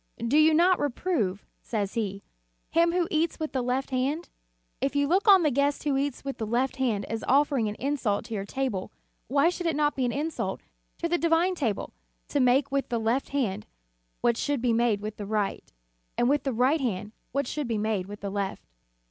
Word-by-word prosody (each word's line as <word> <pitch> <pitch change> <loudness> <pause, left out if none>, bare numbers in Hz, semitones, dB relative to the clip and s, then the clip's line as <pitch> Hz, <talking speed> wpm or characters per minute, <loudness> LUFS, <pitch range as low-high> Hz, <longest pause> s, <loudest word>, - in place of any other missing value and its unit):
"Do 235 +4 -1
you 310 +1 +6
not 360 +3 +4
reprove," 240 - -1 0.2
says 205 -4 -2
he, 200 -3 -3 0.5
"him 335 +1 +4
who 350 -1 +1
eats 320 +1 0
with 310 -1 -3
the 260 - 0
left 255 +2 -1
hand? 275 +6 -1 0.5
If 275 +1 0
you 285 0 +2
look 380 +7 +2
on 385 -3 +8
the 300 - +3
guest 280 +2 +1
who 290 -2 +1
eats 275 -1 -2
with 275 - -4
the 220 - -2
left 255 +4 0
hand 225 -7 0
as 225 0 -4
offering 275 -4 +3
an 210 - -5
insult 260 -7 -1
to - - -7
your 200 -2 -2
table, 210 -4 -3 0.4
why 280 +6 +3
should 355 -1 -3
it 325 - +1
not 295 0 +1
be 265 - -1
an 240 - 0
insult 305 +5 -3 0.4
to 335 - -1
the 345 0 +1
divine 335 +2 +3
table, 240 - -2 0.4
to 290 - 0
make 255 +2 +3
with 275 0 -1
the 235 -1 0
left 230 +5 0
hand 235 - -1 0.5
what 235 -1 +2
should 290 +1 0
be 240 -1 +1
made 225 -3 +2
with 215 0 -5
the 205 - -6
right, 210 -2 -2 0.5
and 240 - +3
with 285 +2 +2
the 270 - +1
right 245 - +1 0.2
what 280 +2 0
should 290 +2 -3
be 230 -2 -1
made 210 -3 -1
with 205 +1 -9
the 200 -1 -4
left." 200 -1 -3
265 Hz, 210 wpm, -27 LUFS, 220-295 Hz, 0.5 s, on